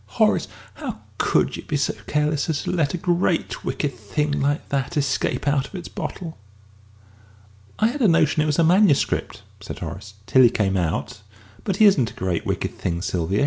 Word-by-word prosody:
"Horace, - - +3 0.3
how - - -6 0.2
could - - +2
you - - -6
be 150 - -2
so 145 - 0
careless 150 +1 0
as 150 -3 -1
to - - -2
let 165 -4 +1
a - - -2
great 175 0 0
wicked 145 -3 -2
thing 145 +7 -2
like 145 +2 0
that 140 +3 -1
escape 140 0 0
out 140 -1 +2
of - - -13
its 180 - -6
bottle?" 165 - -6 1.4
"I 220 - +3
had 280 +4 -4
a 225 - +5
notion 160 -3 +3
it 155 - +1
was 150 - +1
a 170 - +4
manuscript," 175 -2 +2 0.2
said - - -8
Horace 100 +1 -7
"till 130 +4 +4
he 120 - +8
came 95 -4 0
out. 90 +3 -2 0.4
But 195 - -1
he 215 - +5
isn't 145 - +5
a - - -15
great 90 -3 -2
wicked - - -2
thing, 85 +1 -2
Sylvia. 95 +1 -1
145 Hz, 190 wpm, -23 LUFS, 110-170 Hz, 1.4 s, he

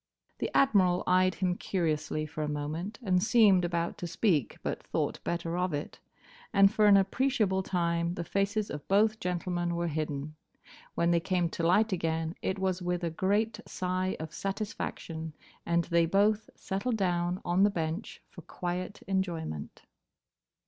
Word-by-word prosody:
The - - -1
Admiral 190 -9 +4
eyed 185 0 +3
him 180 -2 0
curiously 155 -5 -1
for 155 0 -6
a 150 - -1
moment, 155 +8 -4
and 185 -4 +2
seemed 215 -4 +5
about 170 -1 -2
to 175 - -4
speak, 170 - +1
but - - -3
thought - - -2
better 170 0 -2
of 180 -4 0
it; 145 - -6 0.5
and 195 -2 +5
for 215 -1 +4
an 200 -1 +8
appreciable 195 -1 +1
time 170 -2 0
the 170 - -3
faces 200 +4 -1
of 145 0 -7
both 215 +3 +3
gentlemen 175 -2 -2
were 170 0 -1
hidden. 150 -1 -3 0.6
When 170 0 +2
they 170 - +4
came 180 -1 0
to 170 - -5
light 210 +5 +4
again 165 -2 -1
it 190 - -1
was 190 -1 -1
with 180 0 -2
a 170 - -1
great 205 +6 0
sigh 185 +1 -2
of 160 0 -6
satisfaction, 170 -6 -4 0.3
and 170 0 +2
they 170 -1 +2
both 210 +4 +2
settled 220 +5 -2
down 175 -2 0
on 175 +2 +2
the 205 - +6
bench 165 +1 -4
for - - -11
quiet 180 +2 -5
enjoyment. 170 - -3
180 Hz, 160 wpm, -30 LUFS, 170-195 Hz, 0.6 s, an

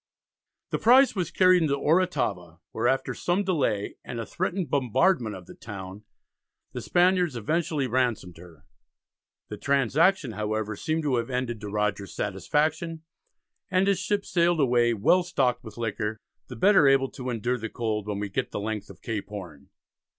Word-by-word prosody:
The - - -1
prize 255 +2 +5
was 180 -3 -1
carried 185 -1 +4
into 145 -3 +1
Oratava, 125 - 0
where 115 +2 0
after 135 - 0
some 180 +3 0
delay, 140 - -1
and 120 - -6
a 115 - -4
threatened 180 - -3
bombardment 130 - +2
of 90 -1 -10
the - - -12
town, 100 -1 -9 0.7
the - - -5
Spaniards 180 -4 +2
eventually 150 +4 -1
ransomed 120 -8 -1
her. 85 -2 -15 0.8
The - - -6
transaction, 140 +3 +2
however, 110 0 -3
seemed 155 +9 -2
to 135 -4 +1
have 115 +1 -2
ended 125 -3 -3
to 105 - -6
Rogers's 105 -2 -2
satisfaction, 160 +2 -1 0.7
and 185 0 +2
his 200 -2 +2
ships 200 +2 -2
sailed 170 -1 +2
away 120 -3 +3
"well 175 - +3
stocked 130 -8 0
with 110 -2 -11
liquor, 110 -1 -3 0.3
the 125 - -8
better 190 - +5
able 135 -1 +3
to 130 -1 -6
endure 120 +1 -1
the 115 0 -5
cold 110 -3 -3
when 105 -1 -2
we 105 0 -3
get 95 - -2
the - - -4
length 105 0 -4
of - - -14
Cape 110 -3 -4
Horn." 85 -9 -9
125 Hz, 165 wpm, -26 LUFS, 105-170 Hz, 0.8 s, prize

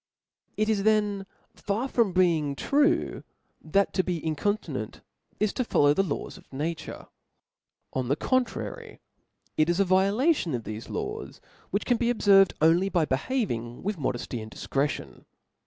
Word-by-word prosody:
It 215 - +1
is 215 -2 +1
then 205 -2 +1 0.3
far 215 +6 -2
from 230 -6 +2
being 165 -6 +2
true, 290 - +1 0.4
that 195 +5 +1
to 185 - +2
be 180 -2 -2
inconti 165 +7 -1
nrnt - - -5 0.4
is 210 -1 +1
to 255 - 0
follow 145 -10 +3
the 195 - +2
laws 180 -7 -4
of - - -23
nature; 155 +4 -4 0.9
on 130 -2 -1
the 140 - +2
contrary^ 255 - -2 0.6
it 155 +2 +3
is 175 +2 +1
a 200 - +4
violation 195 - +2
of 115 - -4
thefe 110 +1 -7
laws, - - -5 0.3
which 200 - -1
can 245 -2 +2
beobfervcd 205 -5 +4
only 170 +4 +4
by 175 -5 +2
behaving 130 - -2
with 205 0 -2
modefty 120 -3 -3
and 110 - -8
difcretion. 140 +5 -3
190 Hz, 150 wpm, -27 LUFS, 150-215 Hz, 0.9 s, a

